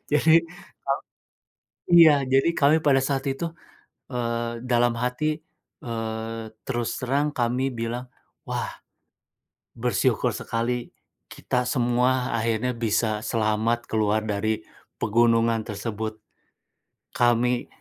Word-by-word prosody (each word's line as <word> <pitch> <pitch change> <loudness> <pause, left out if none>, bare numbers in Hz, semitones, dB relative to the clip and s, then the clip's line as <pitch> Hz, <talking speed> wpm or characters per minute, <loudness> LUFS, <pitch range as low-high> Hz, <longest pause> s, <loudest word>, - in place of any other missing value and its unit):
Jadi 155 +2 +4 0.5
ka 135 - +2 1.0
iya. 165 -3 +9 0.2
Jadi, 135 +5 +4
kami 145 -1 +4
pada 135 -2 +5
saat 135 0 -1
itu, 170 +5 -4 0.7
eee, 115 -1 -2
dalam 120 0 +3
hati, 155 +5 -1 0.4
eee, 115 -1 -4 0.2
terus 120 -1 -1
terang 140 +4 +1
kami 125 +1 0
bilang, 115 +2 -3 0.4
"Wah! - - -2 1.1
Bersyukur 120 -2 +1
sekali. 120 +1 -2 0.4
Kita 125 -1 -2
semua 125 0 +1
akhirnya 115 +2 0
bisa 110 -2 0
selamat 115 +1 0
keluar 110 0 +2
dari 110 +1 0 0.4
pegunungan 115 +1 +3
tersebut." 110 +1 -4 1.0
Kami 120 0 +2
120 Hz, 100 wpm, -25 LUFS, 115-125 Hz, 1.1 s, iya